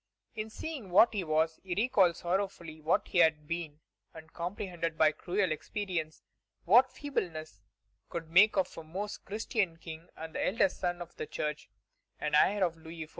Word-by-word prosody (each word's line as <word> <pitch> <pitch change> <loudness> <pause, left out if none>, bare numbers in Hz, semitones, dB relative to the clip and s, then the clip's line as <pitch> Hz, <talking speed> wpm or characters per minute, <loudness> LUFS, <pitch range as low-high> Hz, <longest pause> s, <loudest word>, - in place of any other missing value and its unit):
In 220 -1 -4
seeing 270 - -6
what 205 +6 +6
he 200 -3 -1
was, 160 0 +1
he 185 -2 -3
recalled 200 -5 +3
sorrowfully 175 -4 -3
what 155 +2 +1
he 180 - +2
had 160 -3 +4
been, 160 -2 -4 0.3
and 160 0 -12
comprehended 175 -2 -3
by 155 -1 +5
cruel 185 +3 -1
experience 165 -1 -3 0.4
what 245 +8 +6
feebleness 160 - -4 0.5
could 165 -1 -5
make 195 +6 +6
of 190 - +1
a - - -8
Most 195 +6 -5
Christian 205 -4 -1
King 165 0 -9
and 160 0 -8
eldest 190 -1 +1
son 175 -1 -1
of 170 - -19
the - - -4
Church, 150 0 -4 0.5
an 150 - -2
heir 195 +6 +4
of 170 -2 -3
Louis 160 0 -9
XIV. - - -23
175 Hz, 170 wpm, -31 LUFS, 160-200 Hz, 0.5 s, what